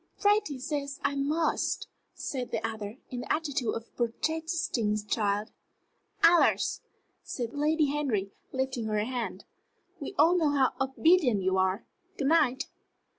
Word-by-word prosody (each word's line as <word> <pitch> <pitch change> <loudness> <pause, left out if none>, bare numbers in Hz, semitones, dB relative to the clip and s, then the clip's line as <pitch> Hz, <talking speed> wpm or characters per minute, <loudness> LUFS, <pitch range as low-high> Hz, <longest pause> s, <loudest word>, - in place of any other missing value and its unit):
"Freddie 410 -8 +2
says 280 +1 -3
I - - +1
must," 295 +4 0 0.3
said 255 -3 -4
the - - -1
other, 220 0 -6
in 250 - -4
the - - -4
attitude 285 -7 0
of 230 - -4
a - - -33
protesting 290 -2 0
child. 205 0 0 0.7
"Alors!" 340 +1 +4 0.4
said 245 -9 -4
Lady 305 +2 +2
Henry, 235 -10 -1 0.2
lifting 260 -3 -2
her 215 -1 0
hand. 245 -1 -4 0.5
"We - - -6
all 345 +2 +6
know 325 -4 +3
how 275 -3 +3
obedient 265 - +3
you 190 0 +2
are. 190 +3 +1 0.3
Good 275 -1 +1
night!" 275 -5 +3
265 Hz, 135 wpm, -29 LUFS, 225-310 Hz, 0.7 s, all